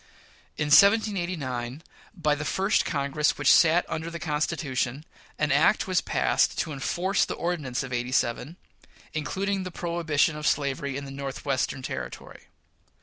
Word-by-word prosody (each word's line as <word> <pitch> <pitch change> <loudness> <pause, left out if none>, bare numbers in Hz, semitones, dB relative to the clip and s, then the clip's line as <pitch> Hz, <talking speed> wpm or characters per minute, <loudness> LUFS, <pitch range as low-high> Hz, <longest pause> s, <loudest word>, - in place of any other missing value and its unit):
In 150 - -1
1789, 170 - +3 0.3
by 155 -5 +1
the 145 0 -3
first 195 +7 +1
Congress 145 0 0
which 145 -2 +5
sat 170 +1 +5
under 160 +1 -4
the 170 - -6
Constitution, 150 -4 -2 0.3
an - - 0
act - - +3
was - - +1
passed - - +1
to 155 - -2
enforce 180 +8 0
the - - -3
Ordinance 150 -9 -2
of 130 -1 -7
'87, 125 +5 -1 0.6
including 190 +6 -2
the 185 - -5
prohibition 170 -3 0
of 150 0 -3
slavery 140 -1 -1
in 140 - -6
the 135 - -8
Northwestern 135 -1 -3
Territory. 65 - -7
150 Hz, 140 wpm, -26 LUFS, 135-170 Hz, 0.6 s, which